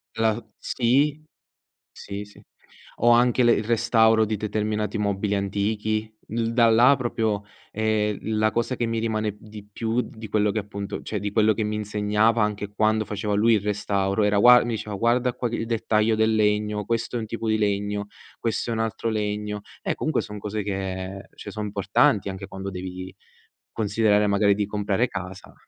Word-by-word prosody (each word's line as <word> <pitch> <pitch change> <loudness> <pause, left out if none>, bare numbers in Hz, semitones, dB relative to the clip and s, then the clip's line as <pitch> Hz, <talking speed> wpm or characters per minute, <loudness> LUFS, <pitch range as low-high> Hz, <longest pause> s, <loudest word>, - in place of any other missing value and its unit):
La 115 0 +1
sì, 140 +5 +1 0.7
sì, 100 +1 -7
sì. 105 - -17 0.6
O 120 - +5
anche 120 +1 +4
le 120 -1 +5
il 110 - 0
restauro 115 -1 +3
di 110 0 -2
determinati 105 +1 -2
mobili 100 0 0
antichi. 105 +2 -1 0.2
L 115 +1 -1
da 115 -1 +5
là 120 +5 +6
proprio, 110 -4 -1 0.3
ehm, 105 -1 0 0.2
la 110 0 +3
cosa 120 +3 -1
che 120 - -1
mi 115 0 -1
rimane 110 -2 -1
di 105 -1 -12
più 115 +3 -1
di 110 -3 -10
quello 105 0 +2
che, 110 - -2
appunto 100 -1 -5
cioè, - - -3
di 105 -1 -3
quello 110 0 +3
che 110 - -2
mi 105 0 -2
insegnava, 105 +2 +1
anche 105 -1 -1
quando 110 +1 +2
faceva 105 0 -3
lui 110 +3 +4
il 105 - +2
restauro, 100 0 0
era 105 0 +2
gua 125 +3 +8
mi 120 - -2
diceva: 105 -1 -5
"Guarda 120 +4 +2
qua 125 0 -2
che 115 - -3
il 115 - -3
dettaglio 110 -1 +1
del 110 0 +2
legno, 105 -1 +1
questo 115 +3 -2
è - - 0
un 110 - -5
tipo 115 +1 -4
di 110 - +3
legno, 100 0 -1 0.3
questo 115 +1 -2
è - - 0
un 110 - -2
altro 115 +1 -2
legno". 105 -1 -2 0.2
Eh, - - -1
comunque 155 -4 0
son 105 -1 -8
cose 105 +1 -3
che 95 -1 -4
cioè, 100 - -9
son 105 0 -4
importanti, 100 0 +2
anche 95 0 -6
quando 95 0 -6
devi 95 0 -7 0.6
considerare, 105 -1 +2
magari, 100 0 +3
di 105 0 0
comprare 105 +3 0
casa. 95 -2 -8
105 Hz, 185 wpm, -24 LUFS, 105-115 Hz, 0.7 s, gua